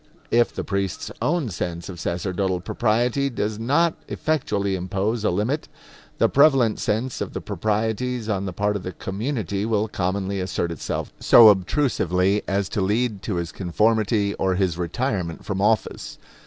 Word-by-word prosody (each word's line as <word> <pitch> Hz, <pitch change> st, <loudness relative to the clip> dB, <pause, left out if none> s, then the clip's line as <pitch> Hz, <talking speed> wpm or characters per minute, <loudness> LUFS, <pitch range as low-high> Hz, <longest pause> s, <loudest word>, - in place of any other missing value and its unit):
If 120 Hz, 0 st, +3 dB
the -, -, -4 dB
priest's 100 Hz, -2 st, -3 dB
own 155 Hz, -5 st, 0 dB
sense 85 Hz, -2 st, -4 dB
of 90 Hz, -3 st, -8 dB
sacerdotal 90 Hz, +2 st, -1 dB
propriety 120 Hz, +7 st, +1 dB
does 110 Hz, -3 st, -3 dB
not 145 Hz, +8 st, +2 dB
effectually 105 Hz, -11 st, -1 dB
impose 100 Hz, +5 st, -2 dB
a -, -, +3 dB
limit, 110 Hz, -, -1 dB, 0.5 s
the -, -, +4 dB
prevalent 135 Hz, -6 st, +4 dB
sense 115 Hz, +4 st, -1 dB
of -, -, -4 dB
the -, -, -3 dB
proprieties 110 Hz, +2 st, -2 dB
on 100 Hz, -3 st, -1 dB
the 95 Hz, -, -3 dB
part 105 Hz, +3 st, 0 dB
of 100 Hz, -, -3 dB
the 90 Hz, 0 st, -6 dB
community 100 Hz, -, -3 dB
will 110 Hz, -1 st, +1 dB
commonly 95 Hz, 0 st, -2 dB
assert 90 Hz, -2 st, -2 dB
itself 80 Hz, -, -4 dB
so 115 Hz, -2 st, +8 dB
obtrusively 100 Hz, -, +2 dB
as 100 Hz, 0 st, 0 dB
to 105 Hz, -, -1 dB
lead 105 Hz, +1 st, 0 dB
to 105 Hz, -, -3 dB
his 85 Hz, -1 st, -3 dB
conformity 105 Hz, +2 st, +1 dB
or 95 Hz, -1 st, +1 dB
his 95 Hz, -3 st, +1 dB
retirement 90 Hz, 0 st, -2 dB
from 95 Hz, -2 st, -2 dB
office. 110 Hz, +1 st, 0 dB
105 Hz, 155 wpm, -23 LUFS, 95-115 Hz, 0.5 s, so